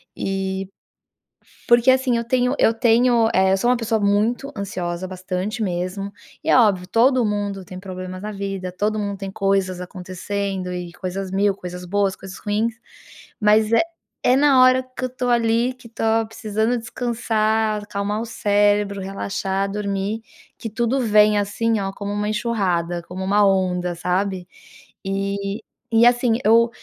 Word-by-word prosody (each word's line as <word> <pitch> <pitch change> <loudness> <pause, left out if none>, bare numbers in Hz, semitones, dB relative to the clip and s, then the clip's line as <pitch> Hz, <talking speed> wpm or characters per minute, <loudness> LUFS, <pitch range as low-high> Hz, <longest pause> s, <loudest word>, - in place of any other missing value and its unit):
E, 195 0 -3 1.0
porque 240 +1 +5
assim 260 -2 +2
eu 235 - -1
tenho 250 +2 +1
eu 225 - +4
tenho, 235 0 +3
eh, 190 +1 +4
eu - - +3
sou 240 +5 +1
uma 250 - +3
pessoa 225 -2 -1
muito 220 +7 +1
ansiosa 185 -2 -4
bastante 185 +4 -3
mesmo, 185 +2 -3 0.3
e - - -2
é - - +6
óbvio 195 -6 +3
todo 250 +4 +3
mundo 205 -2 -2
tem 185 +1 -9
problemas 185 -1 -7
na 215 - -4
vida, 195 -2 -4
todo 210 +4 -1
mundo 200 -1 -3
tem 195 0 -6
coisas 195 -2 0
acontecendo 185 +1 -4
e 180 -1 -5
coisas 185 +1 -5
mil 200 0 +2
coisas 180 -1 -8
boas 195 +1 0
coisas 190 -1 -9
ruins, 215 +3 -1 0.7
mas 215 0 +4
é 230 - +6 0.5
é 250 - +5
na 275 -2 +5
hora 255 0 +5
que - - -4
eu - - 0
estou 250 0 -3
ali, 235 +1 +2
que 250 -2 -15
estou 225 -1 0
precisando 220 +1 -1
descansar, 220 -2 0
acalmar 205 +1 -3
o - - -4
cérebro, 205 -2 +1
relaxar, 195 0 -2
dormir 200 +1 -2 0.4
que 225 - -5
tudo 235 +4 0
vem 210 -2 +4
assim, 215 +2 0
ó, 195 -1 -2
como 205 +1 -5
uma 210 0 -1
enxurrada, 185 -6 -1
como 185 +2 -7
uma 205 +2 +3
onda 180 -2 +1
sabe? 180 +1 -1 0.6
E, 200 +2 -2 0.3
e 230 +1 +5
assim 240 -1 +4
eu, 230 +2 +5
205 Hz, 160 wpm, -21 LUFS, 190-230 Hz, 1.0 s, é